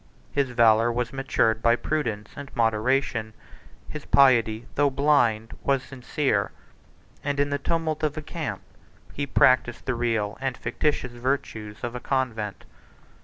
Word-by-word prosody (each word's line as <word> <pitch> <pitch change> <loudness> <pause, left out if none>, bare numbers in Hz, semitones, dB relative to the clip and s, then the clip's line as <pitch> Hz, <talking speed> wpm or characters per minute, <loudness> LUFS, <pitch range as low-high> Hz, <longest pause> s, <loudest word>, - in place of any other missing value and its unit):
His 140 -2 0
valor 115 -1 +4
was 120 0 -2
matured 115 -4 +1
by 115 +1 +4
prudence 120 -8 -3
and 140 -1 -8
moderation; 115 0 0 0.5
his 150 -2 -7
piety, 115 -4 +4
though 145 0 +3
blind, 130 -6 +2
was 135 -2 +1
sincere; 130 +2 -1 0.7
and, 145 0 -1
in 145 0 +1
the 145 - 0
tumult 160 0 -1
of 155 -1 -1
a 155 - -4
camp, 145 - -5 0.5
he 140 0 -3
practised 130 -2 +3
the 130 - 0
real 115 -3 -1
and 130 -2 -2
fictitious 125 +1 -1
virtues 120 -4 -3
of 120 -1 -3
a 125 - -4
convent. 115 -7 -2
125 Hz, 140 wpm, -25 LUFS, 115-140 Hz, 0.7 s, valor